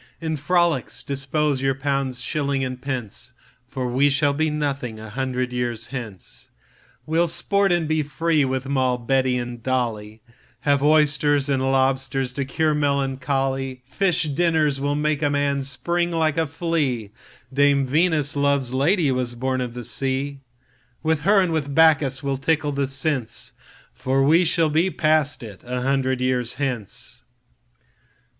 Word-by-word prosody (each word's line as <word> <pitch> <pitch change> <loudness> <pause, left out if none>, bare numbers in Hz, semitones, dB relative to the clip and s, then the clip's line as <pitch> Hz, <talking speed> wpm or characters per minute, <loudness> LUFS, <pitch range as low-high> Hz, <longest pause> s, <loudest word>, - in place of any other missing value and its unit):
In 160 -1 -2
frolics 155 -7 0
dispose 140 0 -1
your 135 0 +1
pounds, 135 -2 -1
shillings, 140 -2 -1
and 130 0 -6
pence, 125 -3 -4 0.3
For 130 -1 -3
we 130 +4 +3
shall 140 +1 +2
be 155 +2 +1
nothing 140 -6 -2
a 110 -1 -9
hundred 125 0 -2
years 120 -2 -3
hence. 115 -8 -7 0.6
We'll 165 +2 +2
sport 200 +4 +1
and 175 -3 +1
be 155 0 +1
free 150 +2 +1
with 130 0 -2
Moll, 130 -2 +1
Betty, 130 +1 +1
and 120 -1 -5
Dolly, 110 -4 -2 0.4
Have 140 -1 +2
oysters 145 -1 +3
and 135 -2 +1
lobsters 135 -1 +1
to 140 +1 -2
cure 155 +4 +1
melancholy:Fish 135 +3 0
dinners 155 -2 +1
will 145 +1 0
make 150 0 0
a 145 - +2
man 145 -1 0
spring 170 +6 -1
like 160 -3 +1
a 160 - +1
flea, 145 - -1 0.4
Dame 140 0 +3
Venus, 150 0 +1
love's 140 -3 +1
lady, 150 +3 +2
Was 125 -2 -2
born 130 +1 -1
of 125 -1 -4
the 120 - -5
sea:With 135 +2 -4
her 200 +5 +4
and 185 -3 +2
with 145 -3 -2
Bacchus 150 -4 +4
we'll 140 -1 -1
tickle 150 +1 +1
the 140 -1 -1
sense, 135 -3 -2 0.4
For 135 +1 0
we 165 +6 +5
shall 165 -1 +2
be 165 +5 +2
past 155 -5 +1
it 105 -4 -10
a 125 0 -3
hundred 130 -1 0
years 125 -2 0
hence. 125 -8 -4
135 Hz, 150 wpm, -23 LUFS, 130-150 Hz, 0.6 s, we